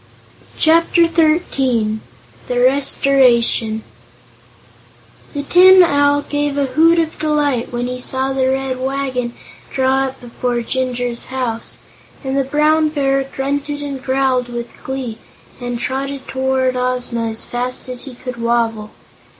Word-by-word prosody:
Chapter 335 +1 +4
Thirteen 270 -10 +1 0.5
The 245 -1 -1
Restoration 250 -4 +3 1.5
The 285 - -2
Tin 370 +4 +7
Owl 285 -2 +2
gave 290 -1 -2
a 280 - +2
hoot 320 +6 +4
of 320 -2 -1
delight 295 -5 0
when 240 0 -2
he 250 0 -4
saw 265 +1 -1
the 260 -1 +1
Red 265 -1 -2
Wagon 260 -2 -2 0.3
draw 265 0 +1
up 265 0 -6
before 245 0 -3
Jinjur's 245 -1 -2
house, 250 -3 -4 0.5
and 265 0 -2
the 275 - +2
Brown 305 +3 +2
Bear 275 -2 +1
grunted 280 +2 -3
and 275 -2 -5
growled 260 -2 +1
with 240 0 -7
glee 260 -4 -5 0.4
and 245 -1 -4
trotted 270 +2 -4
toward 260 -1 0
Ozma 250 -2 -1
as 220 0 -4
fast 250 +1 -4
as 255 +1 -2
he 265 -3 -8
could 250 0 -7
wobble. 230 -2 0
265 Hz, 130 wpm, -18 LUFS, 245-285 Hz, 1.5 s, Tin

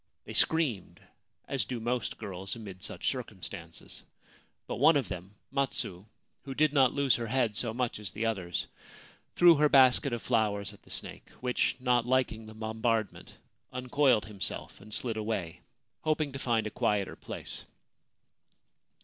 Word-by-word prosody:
They - - -7
screamed, 150 - +2 0.5
as 135 -2 0
do 125 - -4
most 120 +1 -2
girls 95 +1 -5
amid 100 -5 -9
such 105 - -4
circum 115 -8 -7
stances; 85 -4 -8 0.6
but - - -4
one 150 +4 +6
of 130 -9 -1
them, 90 +3 -7 0.2
Matsu, 130 -9 -2 0.4
who 135 -2 -6
did 150 0 +3
not 135 -4 +5
lose 140 -2 +2
her 120 -1 -3
head 120 -3 +1
so 115 +2 0
much 120 -1 -2
as 105 -4 -5
the 110 +2 -2
others, 95 -7 -1 0.7
threw 175 -1 +8
her 150 0 +4
basket 130 0 +6
of 120 -1 -3
flowers 105 -4 +1
at - - -17
the - - -21
snake, - - -3
which, 125 -1 +1
not 125 -2 +2
liking 125 -4 +1
the 110 - -11
bombardment, 110 0 -2 0.3
uncoiled 125 -3 +2
himself 105 -2 -4
and 105 +2 -13
slid 115 +1 0
away, 105 -6 -3 0.4
hoping 155 -2 0
to 140 - -6
find 115 -4 +1
a 110 - -3
quieter 100 -1 0
place. - - -7
115 Hz, 160 wpm, -30 LUFS, 105-130 Hz, 0.7 s, threw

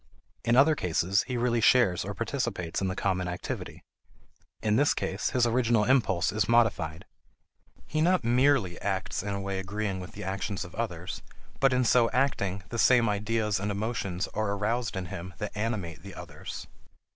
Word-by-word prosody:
In 120 - +3
other 145 +5 +6
cases, 90 - +1
he 125 -2 -2
really 120 -1 +1
shares 110 -7 +4
or 100 +2 -5
participates 115 -8 -2
in 95 - 0
the 95 - -2
common 95 -2 0
activity. 90 0 -5 0.8
In 105 -1 +2
this 145 +5 +3
case, 95 +2 -2
his 125 -1 +2
original 120 -2 +2
impulse 105 -7 +2
is 105 0 0
modified. 105 -9 +2 0.8
He 155 - -1
not 180 0 +3
merely 120 -5 +2
acts 95 -2 -2
in 100 0 -3
a - - -3
way 100 -1 -3
agreeing 100 0 -3
with 90 - -9
the - - -7
actions 95 +1 -3
of 85 - -12
others, 90 -6 -4 0.4
but, 135 -1 +4
in 125 -1 +2
so 115 0 +4
acting, 100 -8 0
the 115 - -4
same 120 -1 +5
ideas 105 0 0
and 100 +1 -2
emotions 100 -3 -2
are 105 -1 0
aroused 110 +3 -1
in 95 -1 -3
him 85 +1 -7
that 105 +2 -5
animate 105 -8 -3
the 100 +2 -10
others. - - -8
105 Hz, 175 wpm, -28 LUFS, 95-120 Hz, 0.8 s, other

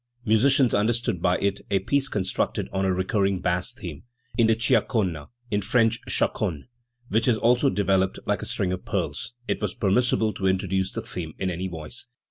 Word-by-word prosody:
Musicians 125 +3 +4
understood 110 -3 +1
by 90 +1 +2
it 100 0 -1
a 100 - +3
piece 135 +8 +1
constructed 95 -7 -1
on 95 0 0
a 95 - +2
recurring 95 +1 +1
bass 90 0 -1
theme; 80 -6 -8 0.3
in 115 -2 +4
the 115 0 +3
cia 115 - +4
cona 90 - -2 0.2
in 105 0 +1
French 115 +2 +2
chaconne 75 -5 0 0.4
which 110 +2 +1
is 120 -3 +4
also 120 +2 +3
developed 95 -1 +1
like - - 0
a - - -4
string 90 -2 -1
of 90 - -5
pearls, - - -3
it - - -1
was 105 -3 -2
permissible 110 +1 +2
to 95 - -1
introduce 95 0 0
the - - -4
theme 80 -3 -6
in 95 -1 -1
any 90 +2 -3
voice. 85 +8 -8
95 Hz, 185 wpm, -25 LUFS, 90-115 Hz, 0.4 s, Musicians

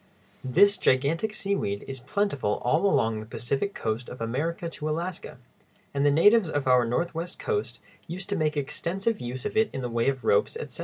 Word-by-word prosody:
This 200 +11 +4
gigantic 155 +11 +2
seaweed 195 - -2
is 135 -1 -5
plentiful 140 - -1
all 155 +10 +3
along 115 - +2
the 110 - -7
Pacific 140 - -2
coast 115 +2 -3
of 125 - -9
America 150 +9 -2
to 155 -2 -5
Alaska, 170 0 -4 0.6
and 140 0 0
the 145 - +5
natives 195 +6 +5
of 145 -3 -1
our 125 -2 +5
northwest 170 +7 -2
coast 430 -2 -2 0.3
used 185 +3 -6
to 200 - 0
make 155 -3 0
extensive 190 +9 -2
use 125 +1 -5
of - - -3
it 220 -1 +3
in 130 - -4
the 125 - -3
way 115 +2 +1
of 135 -2 -3
ropes, 455 0 +2
etc. 470 - -6
155 Hz, 190 wpm, -27 LUFS, 125-195 Hz, 0.6 s, the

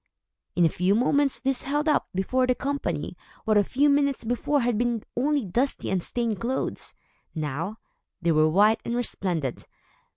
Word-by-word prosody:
In 175 - +4
a - - +4
few 180 +5 +1
moments, 275 +2 +2
these 265 0 0
held 295 +3 -1
up, 300 - +2
before 255 +7 +1
the 250 - +2
company, 275 - -3 0.3
what 215 - +2
a 205 - +5
few 280 +7 +2
minutes 280 -3 +2
before 245 +5 0
had 240 -1 +1
been 235 0 0
only 280 0 +1
dusty 240 +8 -1
and 190 -2 +1
stained 230 +1 -2
clothes. 255 +3 -3 0.4
Now, 155 +7 -3 0.4
they 170 -2 +1
were 155 0 +4
white 210 +6 +4
and 235 - -2
resplendent. 180 - -2
235 Hz, 165 wpm, -26 LUFS, 185-270 Hz, 0.4 s, a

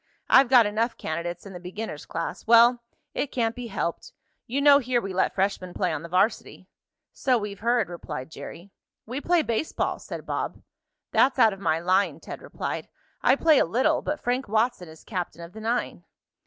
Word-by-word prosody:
I've 265 -2 +7
got 250 -4 +7
enough 225 +3 -1
candidates 170 +3 -4
in 195 - -9
the 180 - -7
beginner's 180 -2 -7
class. 165 +5 -5
Well, 235 +1 +6 0.3
it - - -1
can't 230 -2 0
be 245 -1 -6
helped. 180 -5 -4 0.3
You 260 +4 -1
know 285 0 +7
here 250 -2 0
we 195 -4 -5
let 185 - +1
freshmen 190 -2 -1
play 185 - 0
on - - -3
the 170 - -9
varsity." 185 +6 0 0.5
"So 255 -2 +2
we've 205 -3 -5
heard," 235 +1 +1
replied 160 -5 -7
Jerry. 175 +4 -10 0.3
"We 255 +5 -5
play 345 0 +2
baseball," 235 +6 -1
said - - -8
Bob. - - -4 0.5
"That's 270 - +3
out 225 -5 +5
of 195 - -10
my 160 -4 +1
line," 180 -2 +1
Ted - - -9
replied. - - -5 0.3
"I 260 - +5
play 310 0 +4
a - - +5
little, 260 - +1
but 300 +1 -3
Frank 250 +2 -1
Watson 220 -4 0
is 160 0 -14
captain 180 -4 -5
of 170 - -11
the 220 - -9
nine." 235 +2 -2
220 Hz, 190 wpm, -26 LUFS, 180-245 Hz, 0.5 s, I've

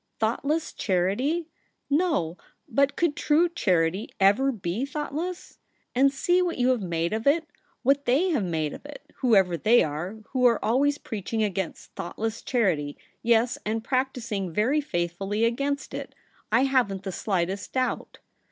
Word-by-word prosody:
' - - -50
Thoughtless 280 +8 0
charity? 225 - 0 0.4
No; 290 - +1 0.3
but 280 0 +2
could 340 -4 +1
true 315 +4 +3
charity 185 - 0
ever 205 +8 +4
be 200 0 -3
thoughtless? 300 +5 -4 0.3
And 270 +2 +4
see 355 +6 +2
what 355 -1 -1
you 250 0 +2
have 250 -4 +2
made 170 0 -1
of 220 +4 -2
it, 320 +3 +4 0.4
what 275 +2 +3
they 290 +10 +3
have 290 -10 +1
made 160 -4 -1
of - - -10
it, 290 0 -12
w^hoever 195 -9 +3
they 235 +3 +5
are, 155 +7 -4
who 255 -2 -1
are 235 -2 +5
always 280 +6 +2
preaching 220 -2 -3
against 190 -3 -3
thoughtless 225 +5 -4
charity 170 - 0
— - - -39
yes. 235 +4 +2
and 220 +1 -2
practising 245 -8 -1
very 245 - +2
faithfully 195 - -1
against 280 +5 -1
it, - - -6 0.4
I 230 +3 +4
haven't 245 -8 +1
the 195 - -4
slightest 190 0 -2
doubt. 255 -1 -2
230 Hz, 155 wpm, -26 LUFS, 195-280 Hz, 0.4 s, they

